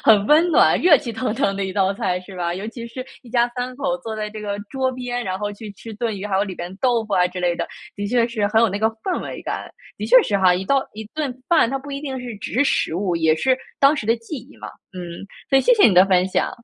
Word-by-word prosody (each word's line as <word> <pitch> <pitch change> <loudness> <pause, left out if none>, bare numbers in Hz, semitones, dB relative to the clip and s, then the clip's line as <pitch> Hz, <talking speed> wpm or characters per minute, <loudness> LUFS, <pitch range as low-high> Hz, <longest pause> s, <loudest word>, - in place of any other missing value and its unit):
很 210 -2 +5
温 310 +6 +5
暖， 330 - +4
热 340 -5 +7
气 235 - -6
腾 225 0 -2
腾 195 -3 0
的 200 - -1
一 190 - -5
道 195 0 +2
菜 185 -5 -1
是 190 +1 -12
吧？ 175 -1 -1
尤 195 +4 -5
其 235 0 -7
是 255 +2 -7 0.2
一 245 - -15
家 240 -1 +3
三 250 +1 -3
口 270 -1 -1
坐 225 -4 -6
在 210 0 -3
这 215 0 -8
个 205 -1 -3
桌 265 -1 0
边， 245 -1 -4
然 185 0 -3
后 205 0 -3
去 210 0 -9
吃 220 +2 -10
炖 220 -1 -2
鱼， 200 - -4
还 200 - -2
有 200 - +2
里 190 -3 -6
边 175 +2 -7
豆 240 -3 +2
腐 205 -2 -2
啊 180 -1 +4
之 180 +1 -7
类 175 -1 +1
的， - - -2 0.3
的 205 0 -4
确 235 +1 +2
是 215 -3 -1
很 220 +1 +3
有 230 - +4
那 200 - -2
个 220 - +3
氛 370 - -2
围 - - -6
感， - - -4 0.3
的 - - -3
确 - - +8
是 205 - 0
哈， 185 -2 +5
一 190 +2 -3
道 275 +4 +2
一 220 - -6
顿 295 -5 -2 0.2
饭， 320 -9 +4
它 270 - -1
不 285 +1 -10
一 275 - -4
定 270 -3 -4
是 245 -3 -6
只 - - -7
是 255 +6 +3
食 160 - 0
物， 180 -1 -1
也 160 -1 +3
是 260 +7 +2 0.2
当 280 +2 +5
时 225 - -4
的 230 - +4
记 230 +7 -7
忆 255 +4 -12
嘛。 - - -8 0.3
嗯， 185 - -6 0.5
所 270 - +6
以 - - +4
谢 - - +5
谢 420 - +6
你 195 - +3
的 185 +1 +8
分 185 -1 +3
享。 - - 0
225 Hz, 315 characters per minute, -21 LUFS, 195-260 Hz, 0.5 s, 确